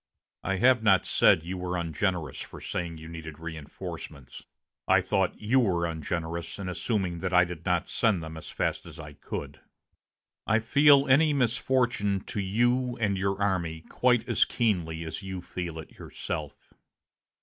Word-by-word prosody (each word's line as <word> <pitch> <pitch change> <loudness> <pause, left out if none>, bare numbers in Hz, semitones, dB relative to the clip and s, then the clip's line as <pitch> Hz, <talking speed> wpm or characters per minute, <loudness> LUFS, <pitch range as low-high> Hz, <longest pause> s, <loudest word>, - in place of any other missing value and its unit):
I 95 - 0
have 125 +4 +4
not 95 -4 +4
said 80 - +4
you 90 +2 -5
were 90 0 -2
ungenerous 85 0 -2
for - - -9
saying 85 -2 -4
you 80 0 -10
needed 80 -2 -8
reinforcements. 75 -4 -8 0.4
I - - +6
thought 95 -3 0
you 115 +5 +3
were 90 -8 +2
ungenerous 85 +1 -4
in 100 -2 -5
assuming 90 -2 -1
that 95 +1 -3
I 90 0 +6
did 85 -2 -8
not 90 -2 +1
send 105 -8 +1
them 80 0 -7
as 80 - -8
fast - - -2
as 85 0 -11
I 75 -1 -9
could. - - -7 0.9
I 110 - +4
feel 140 +5 +5
any 150 +3 +5
misfortune 120 -5 +1
to 105 - -4
you 120 +5 +1
and 105 -3 +1
your 95 0 -1
army 85 -5 -1
quite 125 +6 +1
as - - +4
keenly 85 -9 -1
as 80 - -5
you 95 -1 -5
feel 90 -2 -5
it 80 - -9
yourself. - - -6
95 Hz, 160 wpm, -28 LUFS, 85-110 Hz, 0.9 s, I